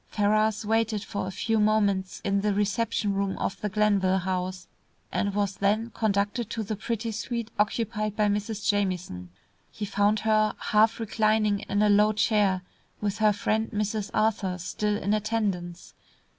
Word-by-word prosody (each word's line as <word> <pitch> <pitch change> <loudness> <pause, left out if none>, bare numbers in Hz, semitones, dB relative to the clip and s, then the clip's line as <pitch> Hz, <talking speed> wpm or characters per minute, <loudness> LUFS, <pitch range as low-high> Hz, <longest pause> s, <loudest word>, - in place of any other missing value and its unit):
Ferrars 215 +1 +1
waited 220 -1 +1
for 200 -4 -4
a - - -4
few 225 +3 0
moments 205 -3 +1
in 200 0 +1
the 205 -1 0
reception 205 0 0
room 195 0 -1
of - - -3
the 210 - -1
Glenville 195 -2 +2
House, 185 0 -3 0.4
and 200 -1 -1
was 200 -2 -1
then 215 +4 +1
conducted 210 +1 -1
to 225 - -3
the 215 +1 -3
pretty 225 +2 -3
suite 230 +1 -4
occupied 215 0 0
by 215 - +2
Mrs. 205 0 -2
Jamieson. 180 - -1 0.4
He 210 - -5
found 205 +1 +1
her 215 -1 +2
half 220 +2 +2
reclining 215 -2 +1
in 205 +1 +2
a - - +4
long, 205 -1 +5
low 215 - 0
chair, 205 -3 +2 0.4
with 205 0 -2
her 215 -1 +5
friend, 220 +1 -1
Mrs. 210 0 -2
Arthur, 210 -4 0
still 210 +4 -2
in 205 0 -1
attendance. 205 -5 -2
210 Hz, 160 wpm, -27 LUFS, 200-215 Hz, 0.4 s, long